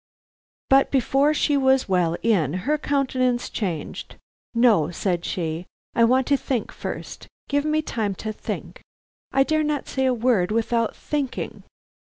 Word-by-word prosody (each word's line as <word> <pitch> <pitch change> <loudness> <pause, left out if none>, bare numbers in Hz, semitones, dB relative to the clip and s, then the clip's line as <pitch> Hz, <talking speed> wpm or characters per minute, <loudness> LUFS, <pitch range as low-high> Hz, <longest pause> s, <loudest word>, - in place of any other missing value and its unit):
But 270 0 +5
before 275 +2 +3
she 300 -1 +1
was 265 -1 +3
well 175 -3 +1
in, 180 - +2
her 300 +1 +1
countenance 255 -4 0
changed. 175 -8 -4 0.4
"No," 225 -10 +4
said 175 0 -1
she, 165 0 -3 0.3
"I 230 - +4
want 255 +2 +3
to 280 +1 +3
think 255 -4 -2
first. - - -7 0.2
Give 285 +1 0
me 310 0 +1
time 215 -8 -2
to 215 +3 -5
think. - - -6 0.5
I 270 - +4
dare 310 +2 +1
not 295 -1 -1
say 265 -1 0
a 255 - +3
word 230 -6 +2
without 230 +1 0
thinking." 285 -4 -3
245 Hz, 150 wpm, -24 LUFS, 200-275 Hz, 0.5 s, But